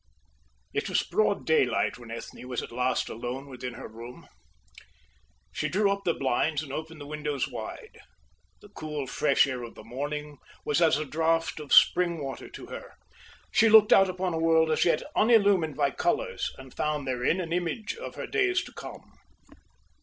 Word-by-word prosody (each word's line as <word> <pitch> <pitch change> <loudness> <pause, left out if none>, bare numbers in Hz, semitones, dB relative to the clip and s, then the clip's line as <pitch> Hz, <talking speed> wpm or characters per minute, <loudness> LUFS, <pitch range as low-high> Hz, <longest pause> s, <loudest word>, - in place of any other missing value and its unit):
It - - -1
was - - +2
broad 215 -2 0
daylight 130 -6 +2
when 120 -2 -12
Ethne 115 +2 -8
was 125 -2 -3
at - - -9
last 125 +1 0
alone 125 +4 -5
within 125 -2 -7
her - - -8
room. 115 +3 -11 1.2
She - - -2
drew 200 +2 +2
up 200 0 -3
the 170 - +2
blinds 140 +3 0
and 135 -3 -8
opened 160 +1 -6
the 145 - -8
windows 150 -2 -2
wide. - - -8 0.6
The 205 - -15
cool 150 -7 -5
fresh 135 +2 +3
air 130 -3 -4
of 120 -1 -9
the - - -11
morning 145 +4 -5 0.3
was 150 +3 +1
as 160 -3 +5
a 155 - -3
draught 165 +2 0
of 150 -2 -9
spring 175 -2 +5
water 135 -4 -6
to - - -10
her. - - -9 0.6
She 225 - +5
looked 215 -1 +8
out 195 -1 +6
upon 185 -1 -2
a 160 - -1
world 160 -1 +3
as 155 - +2
yet 170 - +2
unillumined 200 - +4
by - - +1
colours - - -1
and 130 -1 -12
found 150 -2 -2
therein 130 +7 0
an 170 -2 -3
image 180 - -2
of 470 - -8
her - - -5
days 390 -4 +1
to - - -12
come. - - -11
150 Hz, 180 wpm, -28 LUFS, 130-180 Hz, 1.2 s, looked